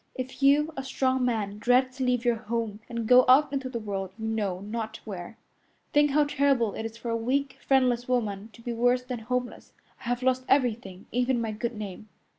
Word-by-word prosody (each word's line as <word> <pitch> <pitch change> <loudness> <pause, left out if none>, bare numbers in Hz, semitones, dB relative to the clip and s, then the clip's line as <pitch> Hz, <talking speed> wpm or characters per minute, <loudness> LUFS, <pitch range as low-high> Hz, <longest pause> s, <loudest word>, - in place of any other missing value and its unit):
If 260 +1 -6
you, 295 +3 +4
a 270 - -4
strong 260 -1 0
man, 210 -4 -2
dread 250 +3 +3
to 260 0 -4
leave 250 -1 +1
your 240 -1 +3
home 220 -1 -3
and 235 -1 -3
go 250 +3 +7
out 280 +2 +6
into 270 -2 -2
the 245 - -4
world 200 -4 -4
you 220 - -5
know 210 -5 -1
not 220 +1 -5
where, 190 -1 -7 0.6
think 295 0 +5
how 295 +2 +4
terrible 275 -6 +1
it 225 - -3
is 225 0 -12
for 235 0 -4
a - - +1
weak, 265 +4 -1
friendless 250 -3 +2
woman 220 -4 -1
to 230 - -16
be 240 - -3
worse 245 +2 +2
than 250 -2 -5
homeless. 250 +2 -4 0.3
I - - -16
have 245 +1 -1
lost 255 0 +2
everything, 225 -8 0
even 250 +1 +1
my 225 -2 -2
good 230 +3 -3
name." 210 0 -7
240 Hz, 210 wpm, -27 LUFS, 220-260 Hz, 0.6 s, go